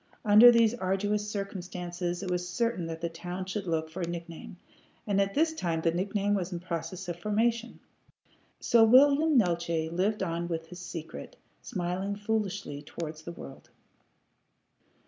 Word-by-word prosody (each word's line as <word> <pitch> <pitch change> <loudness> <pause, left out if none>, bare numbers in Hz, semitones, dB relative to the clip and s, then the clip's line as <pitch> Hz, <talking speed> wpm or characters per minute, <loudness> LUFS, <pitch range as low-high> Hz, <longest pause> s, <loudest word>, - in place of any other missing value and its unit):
Under 215 +4 +9
these 230 -1 +4
arduous 205 0 -1
circumstances 180 -3 -4
it 185 - -3
was 180 0 -2
certain 185 -3 -1
that 165 0 -6
the 170 - 0
town 175 +3 -6
should 190 0 -4
look 160 -1 0
for 170 +4 -7
a 170 - -1
nickname, 170 0 -7 0.5
and 200 -1 +2
at 195 0 -1
this 320 +2 +2
time 170 - -2
the 165 - +2
nickname 200 +3 0
was 190 -2 -1
in 175 - -3
process 175 +1 -5
of 175 -1 -5
formation. 230 +4 0 0.8
So 235 -1 +5
William 280 +6 +6
Neeltje 170 -5 +1
lived 195 +4 0
on 170 -1 -2
with 165 -1 -3
his 180 - -9
secret, 165 - -8 0.3
smiling 185 +3 -3
foolishly 205 -8 -3
towards 155 +1 -7
the 170 - -7
world. 135 -5 -11
185 Hz, 155 wpm, -29 LUFS, 170-210 Hz, 0.8 s, Under